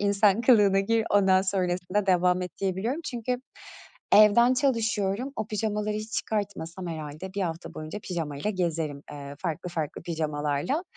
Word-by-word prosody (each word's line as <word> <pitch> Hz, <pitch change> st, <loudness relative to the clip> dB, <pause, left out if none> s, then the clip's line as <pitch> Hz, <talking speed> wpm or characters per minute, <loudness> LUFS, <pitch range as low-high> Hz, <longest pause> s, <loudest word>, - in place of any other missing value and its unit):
insan 200 Hz, +1 st, +3 dB
kılığına 205 Hz, -5 st, +5 dB
gir, 225 Hz, +2 st, +1 dB
ondan 190 Hz, -2 st, +4 dB
sonrasında 185 Hz, +1 st, -1 dB
devam 180 Hz, 0 st, +3 dB
et 180 Hz, -, -4 dB
diyebiliyorum 195 Hz, -, -1 dB
çünkü 245 Hz, 0 st, -2 dB, 0.8 s
evden 225 Hz, +4 st, +7 dB
çalışıyorum, 230 Hz, -2 st, 0 dB
o 215 Hz, -, -2 dB
pijamaları 210 Hz, 0 st, -1 dB
hiç 215 Hz, +1 st, -6 dB
çıkartmasam 190 Hz, -4 st, -3 dB
herhâlde 155 Hz, +4 st, -6 dB
1 200 Hz, -, -1 dB
hafta 165 Hz, -1 st, -4 dB
boyunca 155 Hz, +6 st, -6 dB
pijamayla 160 Hz, 0 st, -3 dB
gezerim, 165 Hz, -6 st, -2 dB
eee, 140 Hz, -1 st, -8 dB
farklı 175 Hz, 0 st, -3 dB
farklı 160 Hz, -3 st, -4 dB
pijamalarla 155 Hz, -, -1 dB
190 Hz, 135 wpm, -27 LUFS, 165-215 Hz, 0.8 s, evden